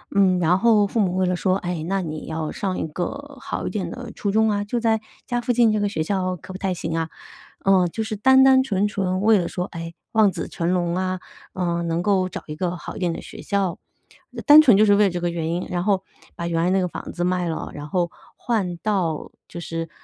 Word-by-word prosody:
嗯， 190 -2 +4
然 175 +1 +3
后 220 -1 +4
父 215 +3 -2
母 185 -4 +1
为 185 0 +2
了 180 0 +1
说： 185 +1 +1
“哎， 175 -3 -2
那 195 +1 0
你 155 -3 -6
要 160 -1 -3
上 190 -2 -3
一 - - -2
个 275 - -5
好 275 - -4
一 - - -1
点 190 -6 -3
的 - - -7
初 205 - -3
中 220 +2 +3
啊， 205 0 0
就 225 +4 -2
在 225 -1 +1 0.2
家 245 -1 -1
附 245 - 0
近 235 -2 +4
这 215 - +1
个 205 0 0
学 160 -6 -2
校 185 +1 -1
可 185 +2 -11
不 185 - -7
太 190 -2 -1
行 165 -2 -4
啊！” 165 0 -1 0.6
呃， 190 -2 +4
就 220 +6 -3
是 215 0 -4
单 265 +5 +5
单 265 0 +6
纯 205 -6 0
纯 190 -2 -1
为 215 0 +5
了 175 - -1
说， 180 - -3
哎， 165 -2 -7 0.2
望 215 -3 +4
子 170 -3 -5
成 170 +1 -2
龙 175 -1 0
啊， 185 0 -1 0.3
呃， 170 -2 -1
能 170 +1 -1
够 190 -2 +2
找 - - -7
一 150 - -7
个 180 +2 -2
好 - - -8
一 - - -7
点 180 -2 0
的 - - -5
学 - - -10
校， 195 -4 -1 0.6
呃， - - -5
单 300 0 +10
纯 245 -10 +6
就 215 - +6
是 205 - +5
为 210 +1 +5
了 - - +3
这 175 -1 -3
个 175 0 -1
原 165 -1 -3
因， 175 +2 -2
然 175 -1 -1
后 195 -1 +1 0.3
把 170 - -4
原 165 -1 0
来 175 - +2
那 190 +1 +3
个 180 - 0
房 - - -7
子 175 - -3
卖 180 -1 0
了， 160 - -4
然 150 0 -8
后 175 0 0 0.3
换 200 -8 -1
到 180 -6 -1 0.2
就 170 - -7
是， 165 -1 -5
185 Hz, 275 characters per minute, -23 LUFS, 170-210 Hz, 0.6 s, 单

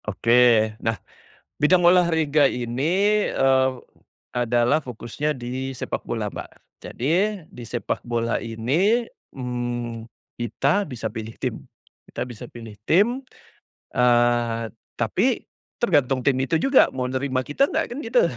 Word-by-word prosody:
Oke, 115 0 +4
nah 115 -1 -1 0.6
bidang 175 +4 +4
olahraga 160 -5 +4
ini 165 - +1
eee, 130 0 +3 0.6
adalah 120 +4 +2
fokusnya 130 +4 -4
di 130 +2 -4
sepakbola 115 -4 -4
Mbak, - - -7 0.3
jadi 135 +7 -2 0.3
di 125 - -13
sepakbola 115 0 -2
ini 150 - +1 0.3
mmm, 120 -2 -4 0.2
kita 140 - 0
bisa 115 -4 -5
pilih 110 -1 -7
tim, - - -3 0.5
kita - - -4
bisa 120 -1 -9
pilih 115 -2 -10 0.2
tim, 225 +10 +3 0.7
eee, 120 -1 +2 0.3
tapi 120 - 0 0.3
tergantung 140 - +1
tim 130 -1 +2
itu 135 +5 0
juga 265 - +5
mau 125 -1 -2
nerima 130 0 -1
kita 145 - +1
enggak - - -2
kan 245 - -5
gitu 485 +10 +2
125 Hz, 120 wpm, -23 LUFS, 120-155 Hz, 0.7 s, juga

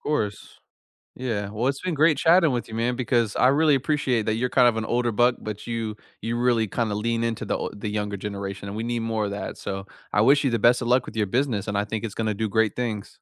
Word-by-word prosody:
course. 105 -9 -3 0.6
Yeah, 110 -6 -2
well, 110 +5 -1
it's 135 0 -2
been 185 -2 -2
great 155 +1 +4
chatting 170 0 +5
with 120 -2 -2
you, 110 - -8
man, 120 +2 0
because 120 -4 0
I - - +4
really 145 +1 +4
appreciate 130 -4 0
that 110 - +1
you're 125 +3 0
kind 125 -2 +5
of 120 -2 +3
an 110 - -1
older 120 0 0
buck, 120 +3 +3
but 105 -1 -6
you 115 -2 -3 0.3
you 115 +2 -2
really 120 -2 +2
kinda 110 +1 -1
lean 115 +2 -1
into 115 -1 -2
the - - -1
o - - -4
the 105 +1 -5
younger 105 -1 -2
generation, 100 0 -5
and 100 - -6
we 110 - -2
need 120 0 -2
more 110 -2 -1
of - - -4
that, 100 - -5
so 95 0 -5 0.3
I 105 - +3
wish 140 +5 +5
you 135 - +1
the 115 - +1
best 120 +4 +4
of 120 - -2
luck 125 +1 +3
with - - -9
your 105 -2 +1
business, 115 -2 -1
and 105 0 0
I 100 - +1
think 105 0 -4
it's 110 -2 -4
gonna 110 -2 -1
do 110 +2 -2
great 110 0 +1
things. 110 -5 -3
115 Hz, 265 wpm, -24 LUFS, 105-125 Hz, 0.6 s, chatting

